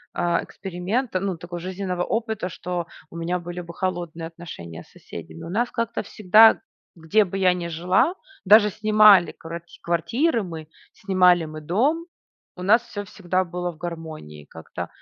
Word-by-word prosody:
э, 175 -1 +1
эксперимента, 190 +4 -3
ну, 190 -2 -2
такого 175 +1 -7
жизненного 185 0 -4
опыта, 220 -4 -2
что 175 -1 -4 0.2
у - - -12
меня 170 +2 -1
были 175 0 -6
бы 170 -1 -10
холодные 175 -3 -3
отношения 125 - -9
с - - -24
соседями. 125 - -10
У - - -7
нас 235 +7 0
как-то 230 -1 -2
всегда, 215 +2 +5 0.4
где 170 +6 +2
бы 195 +1 -5
я 185 -2 +4
не 175 -1 -4
жила, 180 - +2 0.3
даже 210 +1 +6
снимали 215 -3 +6
кварть 170 +1 -10
квартиры 230 - +1
мы, 165 -5 -7 0.3
снимали 180 -3 +3
мы 155 0 -8
дом, 275 - 0 0.5
у 180 - -8
нас 215 +5 +5
всё 215 -4 -7
всегда 185 -2 -1
было 175 0 -4
в 160 - -18
гармонии. 160 - -8
Как-то 80 - -7
180 Hz, 160 wpm, -23 LUFS, 170-205 Hz, 0.5 s, даже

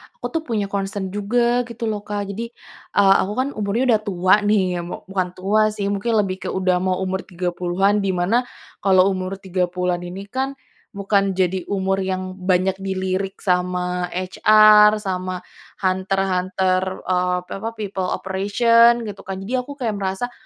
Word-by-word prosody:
aku - - -9
tuh 325 - -1
punya 215 -4 0
concern 195 -1 -3
juga 240 +4 +1
gitu 235 -1 -4
loh, 210 -1 -4
Kak. 205 -1 -3
Jadi, 225 +4 -4 0.5
eee, 195 -1 +6
aku 200 - -2
kan 260 +2 0
umurnya 215 +1 -1
udah 215 - +3
tua 185 -3 +3
nih, 195 -4 +1
ya - - -2
mu 175 - -7
bukan 185 -1 -2
tua 200 +4 +1
sih 205 -2 -3
mungkin 205 +4 -1
lebih 185 -1 -3
ke - - -2
udah 185 -1 +1
mau 185 0 0
umur 190 0 -2
30an 180 +3 0
di 195 - -1
mana 225 +8 +1 0.3
kalau 190 0 +4
umur 185 0 -3
30an 180 -1 -1
ini 185 +3 -7
kan, 270 +1 -2 0.4
bukan 200 -1 +1
jadi 185 0 0
umur 195 -1 0
yang 185 0 -3
banyak 185 +1 +1
dilirik 190 0 -2
sama 180 -1 0
HR 210 +3 +6
sama 185 -1 -3 0.4
hunter-hunter, 185 0 0
eee, 180 0 +1
pi - - -19
apa 225 - -3
people 195 -4 -3
operation 230 +6 +3
gitu 205 -3 -7
kan, 195 0 -5
jadi 255 +5 -1
aku 285 - -7
kayak 245 -6 -2
merasa 195 +6 -2
195 Hz, 165 wpm, -21 LUFS, 185-210 Hz, 0.5 s, eee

